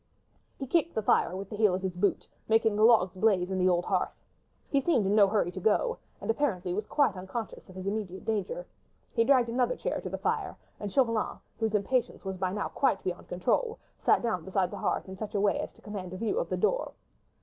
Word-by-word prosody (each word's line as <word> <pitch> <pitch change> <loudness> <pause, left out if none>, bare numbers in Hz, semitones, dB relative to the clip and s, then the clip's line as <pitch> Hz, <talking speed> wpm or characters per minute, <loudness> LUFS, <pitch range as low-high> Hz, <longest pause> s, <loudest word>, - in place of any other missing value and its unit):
He 270 - -4
kicked 330 +4 +1
the 220 - 0
fire 185 - +3
with 195 0 -6
the - - -4
heel 210 -3 +3
of 185 - -4
his 190 -1 -1
boot, 195 +3 0 0.2
making 225 -1 +4
the 210 - 0
logs 220 -6 +5
blaze 190 -2 +2
in 190 - -1
the 185 0 +4
old 175 -1 +2
hearth. - - -1 0.5
He 280 - +3
seemed 265 - +2
in 195 - +2
no 210 -2 +6
hurry 195 -3 +1
to 185 - -6
go, 345 - +1 0.2
and - - 0
apparently 200 -9 -1
was 210 +2 -3
quite 275 -9 +2
unconscious 190 +4 -6
of 185 - -13
his 185 0 -6
immediate 195 -2 -3
danger. 225 - -2 0.5
He 230 - +3
dragged 250 -2 +4
another 250 - +1
chair - - -2
to - - -5
the - - -3
fire, - - -2 0.2
and 205 -1 -4
Chauvelin, 230 -4 +1 0.2
whose 220 -1 0
impatience 230 +2 0
was 190 -1 -3
by 185 0 -1
now 205 +1 -2
quite 270 -8 +1
beyond 180 -1 -4
control, 450 - 0 0.3
sat - - +4
down 215 -8 -1
beside 190 0 0
the 205 - -6
hearth, - - -1
in 190 0 -8
such 210 +1 -6
a - - +2
way 200 0 +2
as - - -4
to - - -23
command 195 -4 -6
a - - -5
view 230 - 0
of - - -2
the - - -1
door. - - 0
210 Hz, 235 wpm, -29 LUFS, 190-235 Hz, 0.5 s, no